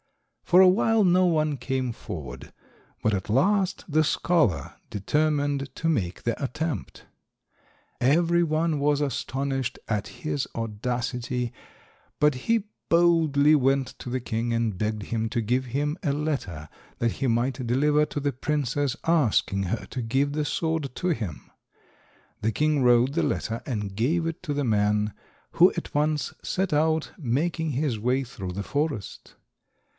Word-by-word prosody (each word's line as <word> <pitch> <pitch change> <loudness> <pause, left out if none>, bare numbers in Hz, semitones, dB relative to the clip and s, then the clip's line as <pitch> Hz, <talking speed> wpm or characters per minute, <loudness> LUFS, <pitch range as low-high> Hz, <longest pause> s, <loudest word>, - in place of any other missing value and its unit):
For 180 - +5
a 190 - +9
while 215 +3 +4
no 180 +1 +4
one 155 -3 +1
came 130 -1 -2
forward, 75 - -8 0.5
but 110 - +2
at 95 +1 -3
last 190 - +2
the 155 -1 +3
scholar 155 - +1 0.2
determined 145 +4 0
to 165 - -2
make 100 - -1
the 120 +4 -2
attempt. 140 - -4 1.0
Every 170 +6 +3
one 160 -1 0
was 145 0 +2
astonished 135 -2 -2
at 105 -2 -1
his 145 -3 -3
audacity, 120 +2 -3 0.7
but 150 0 +4
he 215 - 0 0.2
boldly 160 -4 +4
went 135 -1 +2
to - - -7
the 130 +1 -1
king 120 -1 -2
and 115 -4 0
begged 105 +1 -2
him 110 +1 -2
to 120 - -1
give 125 +4 0
him 145 +5 -1
a 145 - +1
letter 140 - -3 0.3
that 115 -1 +1
he 135 - -2
might 125 +3 0
deliver 145 +5 +3
to - - -4
the 145 -1 -1
princess 145 0 -1
asking 125 -11 +2
her 115 - -2
to 130 - -5
give 135 +5 0
the 150 0 0
sword 160 -4 -1
to 180 - -1
him. 110 - -3 0.9
The 110 - +1
king 150 +2 +1
wrote 125 +2 +4
the 170 - +1
letter 115 0 -2
and 105 -6 -3
gave 155 - +1
it 165 +1 -4
to 150 -5 -2
the 145 -1 -1
man, 105 -1 +1 0.4
who - - +6
at - - -5
once 150 0 0
set 190 -3 -1
out, 160 +1 +1
making 160 +5 -1
his 135 -4 -1
way 125 +4 +1
through 95 -7 -6
the 100 +3 -4
forest. 145 -4 -3
135 Hz, 150 wpm, -26 LUFS, 115-155 Hz, 1.0 s, a